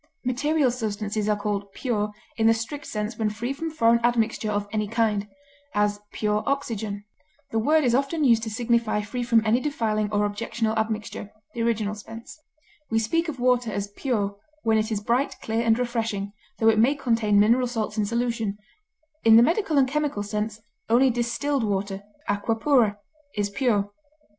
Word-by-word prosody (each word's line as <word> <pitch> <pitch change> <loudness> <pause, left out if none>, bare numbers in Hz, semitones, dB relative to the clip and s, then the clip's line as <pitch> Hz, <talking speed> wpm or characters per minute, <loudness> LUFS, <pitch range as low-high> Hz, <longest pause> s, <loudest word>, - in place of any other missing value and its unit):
Material 280 +2 +2
substances 215 -2 -2
are 210 - +3
called 205 -1 -3
pure 210 -5 -1 0.2
in 225 -1 +2
the 225 - +5
strict 280 +6 -5
sense 215 +1 -4
when 220 -1 +1
free 235 +5 -3
from 325 +4 -4
foreign 235 -6 +3
admixture 225 -2 +1
of 205 -1 -1
any 215 -1 -1
kind; 215 -2 0 0.5
as, 205 0 +1
pure 210 0 0
oxygen; 220 -7 -2 0.5
the 225 - +1
word 305 +7 +3
is 245 -3 +2
often 280 +5 +1
used 230 -4 +5
to 225 - -3
signify 230 -1 +1
free 245 +4 -4
from 230 -2 +3
any 220 +3 +3
defiling 220 -7 -1
or 205 0 +2
objectionable 220 +2 -2
admixture 220 -2 -3 0.2
(the 235 - -3
original 220 -3 0
sense); 225 +6 -10 0.5
we 225 - +1
speak 330 +10 +1
of 275 -4 -6
water 245 -2 +2
as 200 0 -3
pure 205 -3 -2 0.3
when 220 -1 +3
it 215 +1 -2
is 210 - 0
bright, 240 +6 0
clear, 225 +1 -1
and 225 -1 +3
refreshing, 225 -5 -2 0.2
tho 225 - +2
it 220 -1 +5
may 260 +6 +4
contain 225 -6 +2
mineral 235 +5 +4
salts 225 -3 -3
in 215 - +1
solution; 230 -2 -1 0.7
in 225 -1 +7
the 230 - +8
medical 330 - +1
and 265 -2 +5
chemical 290 -6 -1
sense, 210 +1 -3 0.3
only 250 +3 +5
distilled 240 +3 -1
water 200 -1 -2 0.3
(aqua 205 +3 0
pura) 225 -4 +3 0.4
is 205 -1 -1
pure. 205 -4 +1
225 Hz, 175 wpm, -25 LUFS, 210-245 Hz, 0.7 s, the